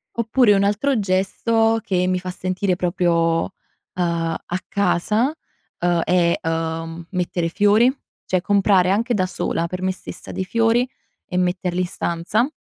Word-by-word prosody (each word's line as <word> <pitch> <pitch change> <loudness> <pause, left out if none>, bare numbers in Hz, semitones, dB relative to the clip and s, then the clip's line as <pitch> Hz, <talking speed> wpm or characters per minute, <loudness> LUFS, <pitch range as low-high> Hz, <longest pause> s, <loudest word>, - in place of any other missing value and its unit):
Oppure 235 -1 +3
un 195 0 +3
altro 220 +5 +1
gesto 225 +4 +1
che 185 -4 0
mi 185 0 +1
fa 185 0 -5
sentire 185 +1 -1
proprio, 175 -1 0 0.3
uhm, - - -6 0.4
a 170 -2 -1 0.2
casa, 210 - +1 0.5
uhm, 175 -1 +2
è, 175 0 +2
uhm, 165 0 -3
mettere 175 -2 -1
fiori, 205 +7 +4 0.4
cioè 185 -1 0
comprare 195 -2 +3
anche 230 +5 +1
da 185 -3 +1
sola, 170 -2 -2
per 185 +1 -5
me 185 0 0
stessa, - - -9
dei 190 - -2
fiori 230 +4 +2 0.4
e 180 - -4
metterli 180 0 0
in 180 - -1
stanza 175 - -1
185 Hz, 145 wpm, -21 LUFS, 175-210 Hz, 0.5 s, fiori